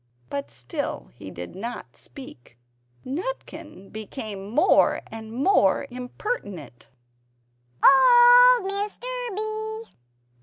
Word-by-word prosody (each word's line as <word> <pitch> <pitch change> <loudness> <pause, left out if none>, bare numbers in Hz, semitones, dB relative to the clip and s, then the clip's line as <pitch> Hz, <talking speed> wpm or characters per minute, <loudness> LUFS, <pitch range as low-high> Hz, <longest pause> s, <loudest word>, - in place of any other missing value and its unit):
But 140 -4 -4
still 120 - -6
he - - -11
did 90 - -9
not 235 +5 -7
speak. 125 - -13 0.5
Nutkin 310 - -7
became 210 -2 -7
more 305 - +3
and 220 0 -9
more 270 - +2
impertinent 245 - -6 1.0
"Old 485 - +7
Mr. 405 +3 -4 0.3
B! 435 +1 -4
265 Hz, 85 wpm, -24 LUFS, -, 1.0 s, Old